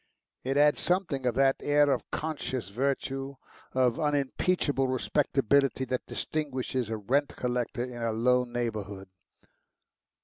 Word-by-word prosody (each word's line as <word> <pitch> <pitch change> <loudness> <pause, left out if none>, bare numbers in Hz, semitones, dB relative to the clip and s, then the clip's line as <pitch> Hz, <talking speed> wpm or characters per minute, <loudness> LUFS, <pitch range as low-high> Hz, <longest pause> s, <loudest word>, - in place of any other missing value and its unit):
It 135 +2 -1
had 150 0 +5
something 170 -8 0
of 120 - +1
that 135 0 +4
air 145 0 +3
of - - -1
conscious 130 - -3
virtue, 135 +3 -2 0.4
of 130 +2 +2
unimpeachable 145 0 +1
respectability, 135 0 +1
that 125 0 -3
distinguishes 130 -5 -2
a 110 - -2
rent 135 +8 0
collector 125 0 -2
in 125 -1 -6
a 115 -1 0
low 125 +3 +3
neighbourhood. 105 -6 -4
130 Hz, 125 wpm, -29 LUFS, 120-140 Hz, 0.4 s, had